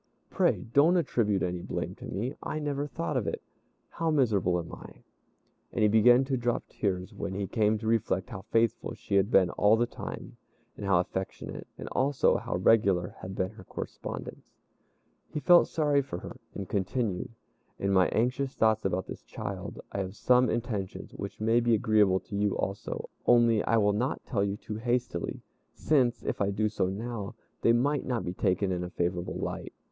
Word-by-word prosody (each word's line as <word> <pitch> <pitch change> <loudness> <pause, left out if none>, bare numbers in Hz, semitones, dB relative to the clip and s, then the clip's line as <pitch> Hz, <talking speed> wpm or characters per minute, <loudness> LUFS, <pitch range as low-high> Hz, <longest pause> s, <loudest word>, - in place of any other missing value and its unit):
Pray - - +2
don't 160 +6 +5
attribute 110 - +1
any 90 -1 -2
blame - - -4
to - - -11
me; 115 +9 -3
I 155 - -3
never 145 -1 -2
thought 85 - -3
of - - 0
it. - - -2 0.5
How 165 -1 -2
miserable 105 - +2
am 85 -1 -6
I!" - - -12 0.7
And - - 0
he - - +6
began 120 +5 +6
to 135 -1 0
drop 120 0 0
tears 95 0 -2
when 95 -1 -4
he 100 0 -1
came 110 +2 +2
to 110 - -8
reflect 115 0 0
how 100 -4 -6
faithful 115 -1 +1
she - - -7
had 100 +1 +4
been 95 -7 +4
all 105 +2 +4
the 120 - +2
time, - - -8 0.4
and 100 - -5
how 95 -3 +4
affectionate, 95 +2 -4
and - - -7
also 135 +1 +2
how - - -4
regular 95 -2 +3
had 95 +1 -7
been 95 +1 -1
her 110 -3 -13
correspondence. - - -7 0.7
He - - -3
felt 175 +3 +6
sorry 145 -3 +2
for 135 - -6
her, 120 - -9 0.2
and 100 -2 -5
continued, 105 +3 -1 0.5
"In 100 - -1
my 95 -1 +5
anxious 130 +4 0
thoughts 110 -1 +3
about 95 -1 -1
this - - -8
child, 100 0 -6
I - - -3
have 95 0 -4
some 125 +2 +4
intentions 110 -5 -3
which - - -7
may 115 +2 +3
be 120 -1 +3
agreeable 105 -3 +3
to 100 - -8
you 100 0 +1
also, 95 +1 -4 0.2
only 115 -3 +5
I 115 - +3
will 105 -1 +3
not 125 +6 -2
tell 100 -6 0
you 100 0 -1
too 105 0 -6
hastily, 120 -5 -2 0.3
since, 125 -6 +2
if - - -2
I 100 - +2
do 105 +2 0
so 100 -3 0
now, 110 +2 -4 0.3
they 115 - +5
might 140 +5 +2
not 125 -3 -1
be 90 - -3
taken 95 0 +1
in 90 -1 -1
a 90 - -5
favorable 90 0 -2
light. - - -4
110 Hz, 190 wpm, -29 LUFS, 95-120 Hz, 0.7 s, he